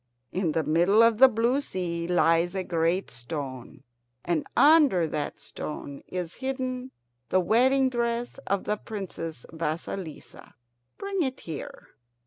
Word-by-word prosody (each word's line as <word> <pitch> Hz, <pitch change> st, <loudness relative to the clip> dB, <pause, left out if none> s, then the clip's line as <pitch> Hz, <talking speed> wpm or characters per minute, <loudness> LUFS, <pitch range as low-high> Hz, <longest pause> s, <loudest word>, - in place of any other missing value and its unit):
In 180 Hz, -4 st, 0 dB
the 160 Hz, -, +1 dB
middle 175 Hz, +9 st, +4 dB
of 230 Hz, -1 st, +4 dB
the 265 Hz, -, +10 dB
blue 240 Hz, +3 st, +1 dB
sea 170 Hz, -8 st, -3 dB
lies 175 Hz, 0 st, +3 dB
a 190 Hz, -, -1 dB
great 170 Hz, +2 st, 0 dB
stone, 130 Hz, 0 st, -6 dB, 0.4 s
and 170 Hz, -3 st, 0 dB
under 290 Hz, -, +6 dB
that 150 Hz, -2 st, -3 dB
stone 140 Hz, -2 st, -7 dB
is 180 Hz, -2 st, -4 dB
hidden 260 Hz, -1 st, -3 dB, 0.4 s
the 185 Hz, -, +3 dB
wedding 255 Hz, +8 st, +4 dB
dress 240 Hz, 0 st, -2 dB
of 200 Hz, 0 st, 0 dB
the 210 Hz, -, -1 dB
Princess 170 Hz, -, -6 dB
Vasilissa. 160 Hz, +1 st, -5 dB, 0.4 s
Bring 395 Hz, -2 st, -2 dB
it 265 Hz, -4 st, -2 dB
here." 160 Hz, -4 st, -8 dB
185 Hz, 130 wpm, -27 LUFS, 165-245 Hz, 0.4 s, the